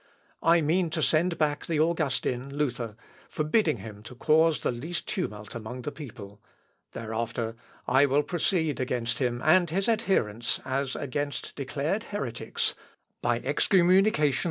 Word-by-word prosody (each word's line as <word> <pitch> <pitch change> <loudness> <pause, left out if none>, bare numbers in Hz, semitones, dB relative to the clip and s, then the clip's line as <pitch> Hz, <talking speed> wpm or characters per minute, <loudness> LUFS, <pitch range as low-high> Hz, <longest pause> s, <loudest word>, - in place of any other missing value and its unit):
I 165 +1 +5
mean 165 +3 +2
to 155 - +1
send 165 +2 +2
back 150 -1 0
the 160 -3 0
Augustin, 140 -4 0
Luther, 125 -7 -2 0.3
forbidding 155 +2 +1
him 105 -2 -9
to 120 +4 -11
cause 160 +4 +3
the - - +1
least 155 +9 -4
tumult 105 - -4
among 120 +2 -6
the 150 - -3
people; 110 -8 -10 0.5
thereafter 115 0 -3 0.3
I 135 +3 +5
will 140 +2 +3
proceed 160 -5 0
against 120 -2 -1
him 120 -1 -1
and 175 +2 +5
his 195 +4 0
adherents 190 - +1
as 135 0 -1
against 145 -1 -3
declared 145 - -2
heretics, 125 - -2 0.5
by 120 0 +1
excommunication. 175 - +3
145 Hz, 135 wpm, -28 LUFS, 120-165 Hz, 0.5 s, I